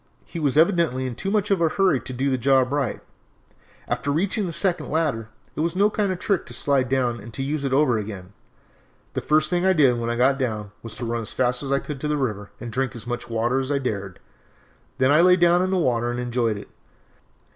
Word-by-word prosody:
He 170 - -7
was 145 -2 0
evidently 165 -6 +3
in 130 - -3
too 190 +11 -3
much 205 0 0
of 190 -3 +2
a 165 - +3
hurry 185 -6 +2
to 125 - -7
do 135 +2 -1
the 130 - +1
job 130 0 +3
up - - -4
right. 140 -6 -1 0.9
After 145 - -2
reaching 185 +6 0
the - - -4
second 180 +2 -1
ladder, 145 -9 -1 0.3
it - - -6
was 165 +2 0
no 205 +3 +3
kind 205 -2 0
of 185 - -2
a - - -21
trick 195 -2 -1
to 120 - -8
slide 135 0 +1
it - - +4
down 120 -2 0
and 115 - -8
use 140 +2 -2
it 135 - -1
over 130 -4 +3
again. 100 -3 -7 0.8
The - - -2
first 155 +1 +2
thing 175 0 +1
I 190 0 +4
did 135 -8 +3
when 115 0 -2
I 120 - -1
got 135 +3 +3
down 110 -5 -3
was 115 -2 -8
to 120 - -4
run 115 0 -2
as 110 - -6
fast 125 -1 +1
as 140 -1 -4
I 140 - +3
could 140 0 -6
to 150 - -3
the 150 0 0
river 105 -7 -3
and 120 -2 -7
drink 130 +1 -1
as 115 - -9
much 120 0 -5
water 115 +3 0
as 135 +1 -3
I 140 - +2
dared, 100 -8 -4 0.8
then 130 +1 +3
I 155 +3 +6
lay 180 +1 +6
down 175 0 +4
in 185 - 0
the 190 - +1
water 120 -7 +1
and 120 0 -3
enjoyed 120 -3 -1
it. 100 - -10
135 Hz, 255 wpm, -23 LUFS, 120-165 Hz, 0.9 s, I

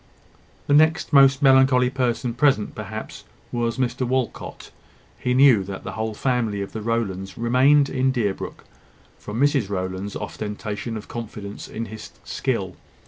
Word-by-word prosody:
The 145 - +1
next 155 +1 +3
most 140 0 +6
melancholy 130 -2 +5
person 125 -2 -1
present, 130 -4 +2
perhaps, 110 +1 -7 0.3
was 120 0 -1
Mr 130 0 -1
Walcot. 130 0 -3 0.5
He 125 0 0
knew 130 -6 +6
that 95 0 -7
the 95 - -5
whole 110 +1 -3
family 120 -6 0
of 100 - -8
the 110 - -5
Rowlands 100 -4 -2
remained 130 +5 +4
in 130 -1 +1
Deerbrook 105 -7 -3 0.6
from 105 +3 -6
Mrs 140 -7 +2
Rowland's 95 +1 -4
ostentation 105 +2 -5
of 105 - -9
confidence 105 -3 -7
in 115 +1 -5
his 110 -1 -9
skill. - - -3
115 Hz, 140 wpm, -23 LUFS, 105-130 Hz, 0.6 s, most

